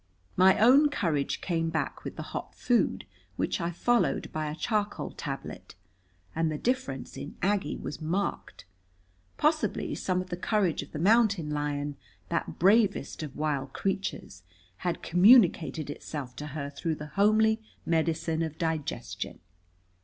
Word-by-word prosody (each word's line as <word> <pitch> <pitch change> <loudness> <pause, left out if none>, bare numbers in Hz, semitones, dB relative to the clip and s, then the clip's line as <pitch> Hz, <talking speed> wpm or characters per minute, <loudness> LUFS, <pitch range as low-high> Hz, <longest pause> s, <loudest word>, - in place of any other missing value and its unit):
My 185 +1 +6
own 270 +7 +6
courage 165 - -1
came 165 -2 0
back 160 -1 -3
with - - -6
the - - -5
hot - - -5
food, 245 -2 +1 0.3
which - - -1
I 170 - 0
followed 240 +8 +1
by 155 -1 -2
a 150 - -4
charcoal 210 +3 -1
tablet. - - -7 0.6
And 165 -1 +1
the 155 - -2
difference 240 - -2
in 145 - -7
Aggie 200 +1 +1
was 150 - -6
marked. 165 - -3 0.7
Possibly 310 +1 +1
some 185 -1 -1
of 185 0 -6
the 175 - -2
courage 190 -3 +1
of 145 - -11
the - - -5
mountain 200 -3 +3
lion, 145 -1 -2 0.3
that - - -2
bravest 200 0 +3
of 150 -4 -6
wild 145 -3 -2
creatures, 195 - -3 0.4
had 175 -1 -3
communicated 175 - +5
itself 140 -4 -6
to 150 - -5
her 140 -1 -5
through 160 +3 -2
the 150 0 -9
homely 220 +2 +4 0.2
medicine 165 0 0
of 160 -1 -3
digestion. 160 -3 -3
165 Hz, 145 wpm, -28 LUFS, 150-205 Hz, 0.7 s, My